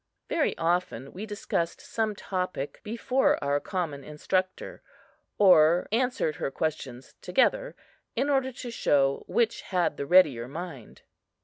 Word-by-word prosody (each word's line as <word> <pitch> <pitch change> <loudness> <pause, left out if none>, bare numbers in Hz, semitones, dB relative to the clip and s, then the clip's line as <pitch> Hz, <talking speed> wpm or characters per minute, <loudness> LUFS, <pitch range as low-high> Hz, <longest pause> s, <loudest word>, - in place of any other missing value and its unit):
Very 315 - 0
often 165 -6 -1
we 205 +4 -6
discussed 175 -5 -2
some 220 -2 -2
topic 185 -8 -4
before 235 +4 +1
our 140 0 +1
common 155 -6 -4
instructor, 185 +6 -3 0.6
or 175 -3 +5
answered 240 - 0
her - - -2
questions 135 -4 -4
together, - - +1 0.4
in 265 +4 +1
order 270 -2 +1
to 245 -1 -7
show 140 -10 +2
which 235 -2 +1
had 180 -5 -1
the 140 - -4
readier 140 -10 +5
mind. 145 -4 -8
180 Hz, 125 wpm, -27 LUFS, 145-220 Hz, 0.6 s, or